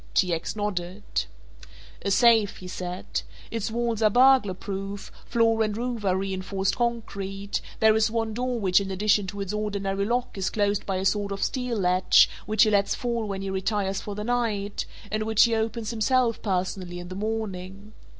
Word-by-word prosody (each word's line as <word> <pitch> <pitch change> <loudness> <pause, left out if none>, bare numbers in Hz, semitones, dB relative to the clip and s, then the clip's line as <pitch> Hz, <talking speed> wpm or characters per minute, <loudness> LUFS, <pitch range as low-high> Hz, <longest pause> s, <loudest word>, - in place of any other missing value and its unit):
T. 180 -3 +3
X. 165 +5 -3
nodded. 195 -2 -3 1.0
"A 200 - -1
safe," 225 -1 +4
he 185 - -9
said; 180 0 -4 0.3
"its 230 -1 -2
walls 230 -1 -1
are 215 - +5
burglar 250 -4 +5
proof, 195 +1 -6 0.2
floor 225 -1 +2
and 215 -1 0
roof 240 -2 -3
are 190 -2 +2
reinforced 190 0 -1
concrete, 200 -4 -2 0.2
there 220 -1 +5
is 220 0 +3
one 225 -1 -1
door 250 +1 -1
which 190 -2 +3
in 195 - -4
addition 200 +1 +2
to 200 +2 -5
its 195 +1 -3
ordinary 200 -2 -1
lock 240 +4 -1
is 190 - 0
closed 205 -1 0
by 195 - 0
a 185 +1 -2
sort 200 0 +1
of 195 - -2
steel 250 -3 -1
latch 185 -1 +5 0.2
which 215 0 +4
he 215 - +3
lets 200 -1 +2
fall 235 -3 -2
when 195 -1 -4
he 195 - -3
retires 195 0 -1
for 205 - -6
the 210 - -4
night 220 -4 -1 0.2
and 215 0 -1
which 220 0 +4
he 235 - +3
opens 225 0 -1
himself 230 +1 +1
personally 185 -2 -2
in 175 0 -8
the - - -6
morning. 200 -1 -4
205 Hz, 185 wpm, -26 LUFS, 195-225 Hz, 1.0 s, are